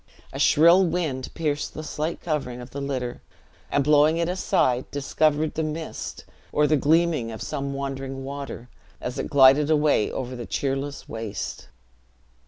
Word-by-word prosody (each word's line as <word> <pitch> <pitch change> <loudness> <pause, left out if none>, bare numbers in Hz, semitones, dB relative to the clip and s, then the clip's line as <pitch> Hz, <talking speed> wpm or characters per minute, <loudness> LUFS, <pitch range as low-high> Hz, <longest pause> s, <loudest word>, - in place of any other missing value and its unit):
A - - -5
shrill 170 +5 +6
wind 160 -7 -1
pierced 150 -3 -2
the 155 - -5
slight 155 +2 -3
covering 140 -7 -3
of 125 0 -10
the 140 - -5
litter, 130 -3 -3 0.5
and 145 - +2
blowing 150 +2 +4
it 170 0 0
aside, 130 -8 +1
discovered 150 +2 +1
the 160 - -2
mist; 155 +1 -5 0.3
or 150 - +3
the 150 +1 +3
gleaming 155 -3 +2
of 110 - -7
some 140 0 -3
wandering 135 -1 -4
water, 140 -3 -6 0.3
as 125 - -5
it - - -3
glided 140 +2 +6
away 150 -8 +3
over 130 -1 -4
the 120 -2 -7
cheerless 140 +1 -3
waste. 105 -8 -5
145 Hz, 155 wpm, -25 LUFS, 130-155 Hz, 0.5 s, shrill